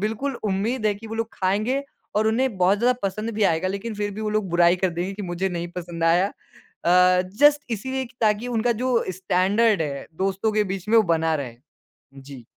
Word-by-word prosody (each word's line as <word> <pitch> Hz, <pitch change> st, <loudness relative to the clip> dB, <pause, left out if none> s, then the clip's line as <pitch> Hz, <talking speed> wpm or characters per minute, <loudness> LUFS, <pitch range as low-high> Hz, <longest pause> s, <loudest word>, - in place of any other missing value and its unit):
बिल्कुल 225 Hz, +6 st, -2 dB
उम्मीद 215 Hz, +4 st, -1 dB
है 205 Hz, -, +2 dB
कि 220 Hz, +3 st, -11 dB
वो 220 Hz, -, -6 dB
लोग 225 Hz, 0 st, -2 dB
खाएँगे 215 Hz, +9 st, 0 dB, 0.3 s
और 215 Hz, +1 st, +2 dB
उन्हें 235 Hz, -1 st, 0 dB
बहुत 185 Hz, +3 st, +3 dB
ज़्यादा 245 Hz, +3 st, +3 dB
पसंद 215 Hz, +3 st, -2 dB
भी 215 Hz, -, -1 dB
आएगा, 175 Hz, 0 st, +2 dB
लेकिन 200 Hz, +3 st, -4 dB
फिर 205 Hz, 0 st, -2 dB
भी 215 Hz, -, -6 dB
वो 215 Hz, -, -2 dB
लोग 215 Hz, -3 st, -1 dB
बुराई 175 Hz, +1 st, +4 dB
कर 185 Hz, 0 st, 0 dB
देंगे 175 Hz, +3 st, -3 dB
कि 205 Hz, -, -6 dB
मुझे 180 Hz, +1 st, -2 dB
नहीं 175 Hz, -1 st, -4 dB
पसंद 170 Hz, -1 st, -4 dB
आया। 175 Hz, +4 st, +4 dB
अ, 180 Hz, -1 st, +1 dB
जस्ट 290 Hz, +1 st, +5 dB
इसीलिए 260 Hz, +5 st, -3 dB
कि 235 Hz, -, -16 dB
ताकि 215 Hz, +2 st, +1 dB
उनका 240 Hz, +2 st, +2 dB
जो 255 Hz, -1 st, +1 dB, 0.2 s
स्टैंडर्ड 190 Hz, +2 st, +2 dB
है 140 Hz, -2 st, -5 dB, 0.2 s
दोस्तों 195 Hz, +3 st, 0 dB
के 215 Hz, 0 st, +2 dB
बीच 190 Hz, 0 st, -5 dB
में, 230 Hz, -, +4 dB
वो 225 Hz, -, +7 dB
बना 165 Hz, -3 st, +1 dB
रहे। 125 Hz, -6 st, -5 dB, 0.6 s
जी। 135 Hz, -3 st, -12 dB
200 Hz, 210 wpm, -23 LUFS, 180-220 Hz, 0.6 s, वो